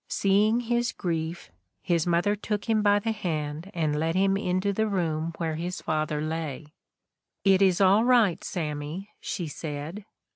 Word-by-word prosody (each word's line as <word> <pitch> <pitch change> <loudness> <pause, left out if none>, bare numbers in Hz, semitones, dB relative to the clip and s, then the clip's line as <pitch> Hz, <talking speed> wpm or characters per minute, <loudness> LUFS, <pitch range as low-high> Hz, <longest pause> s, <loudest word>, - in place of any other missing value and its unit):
Seeing 210 +4 +3
his 240 0 0
grief, 165 - -3 0.3
his 170 -1 +1
mother 175 +4 +2
took 210 0 -3
him 220 -1 +3
by 205 -1 +4
the 225 +2 -1
hand 160 -5 -3
and 155 -3 0
led 165 +2 0
him 195 +1 +3
into 190 0 0
the 220 +2 +1
room 165 -5 -1
where 160 -2 -2
his 175 +2 -4
father 155 -1 -1
lay. 155 -2 -3 0.4
' - - -59
It 190 - +3
is 190 -3 +4
all 200 +3 +5
right, 235 -8 +3
Sammy,' 155 +3 -4
she 175 - -4
said. 155 +5 -6
180 Hz, 160 wpm, -27 LUFS, 160-205 Hz, 0.4 s, all